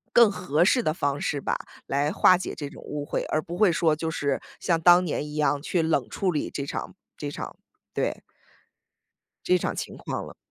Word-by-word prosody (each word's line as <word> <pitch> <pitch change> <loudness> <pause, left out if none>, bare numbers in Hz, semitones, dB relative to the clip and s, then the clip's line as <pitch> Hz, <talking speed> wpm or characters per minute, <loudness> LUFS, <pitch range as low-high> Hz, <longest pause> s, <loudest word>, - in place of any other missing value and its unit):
更 235 -3 +8
合 175 -4 +1
适 240 +6 +4
的 155 - +1
方 145 -4 -1
式 145 - -1
吧， - - -1 0.3
来 140 +2 +1
化 185 - +6
解 180 - -5
这 145 - -5
种 - - -13
误 145 -1 -5
会， - - -2
而 155 - +2
不 170 +2 -6
会 200 0 +5
说 165 -2 +3
就 160 +1 -3
是 140 -4 -1 0.2
像 170 -3 +1
当 175 +2 +7
年 155 -3 -2
一 150 0 -7
样 145 -1 +1
去 170 +2 0
冷 160 -6 +1
处 190 - 0
理 150 - -2
这 140 - -4
场 - - -5 0.2
这 145 - -4
场 - - -7 0.4
对。 - - -1 1.2
这 180 - +3
场 180 - -1
情 - - -5
况 - - -4
了。 - - -11
155 Hz, 225 characters per minute, -26 LUFS, 145-180 Hz, 1.2 s, 更